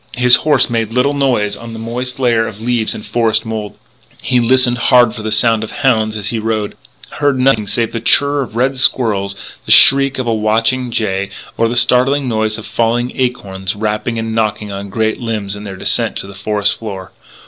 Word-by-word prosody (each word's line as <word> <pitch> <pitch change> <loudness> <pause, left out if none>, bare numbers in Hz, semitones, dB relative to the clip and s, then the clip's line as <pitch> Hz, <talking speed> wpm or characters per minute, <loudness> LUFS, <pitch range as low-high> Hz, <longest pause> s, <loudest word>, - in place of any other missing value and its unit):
His 125 0 +6
horse 145 -4 +2
made 115 -2 -2
little 130 +4 +1
noise 130 -7 0
on 115 0 -10
the - - -7
moist 120 +3 -4
layer 120 -4 +1
of 105 - -9
leaves 115 -1 -1
and 105 - -9
forest 110 +1 0
mould; 110 -2 -6 0.5
he 125 -1 +1
listened 125 0 +3
hard 120 -3 +5
for 115 - -7
the 110 0 -4
sound 110 +1 +2
of 110 - -6
hounds 110 -6 0
as 105 0 -2
he 115 - -2
rode; 110 -1 -3 0.4
heard 145 -2 +1
nothing 125 -5 +2
save 115 +2 -1
the 115 - -4
chirr 145 +4 +2
of 120 -4 -7
red 130 +3 0
squirrels, 105 -6 0 0.3
the - - 0
shriek 135 0 +7
of 130 - -3
a 115 - 0
watching 115 +4 0
jay, 100 -4 -2 0.3
or 115 - +1
the 120 - -3
startling 130 +3 +3
noise 110 -2 -1
of 110 - -9
falling 120 +2 -1
acorns 100 -7 -3
rapping 105 +2 -3
and 110 0 -3
knocking 105 -2 -2
on 100 0 -7
great 110 +2 -1
limbs 105 -4 -3
in 105 +1 -9
their 95 -2 -8
descent - - 0
to - - -5
the 100 - -11
forest 100 +1 -1
floor. 95 -4 -7
115 Hz, 205 wpm, -15 LUFS, 105-125 Hz, 0.5 s, shriek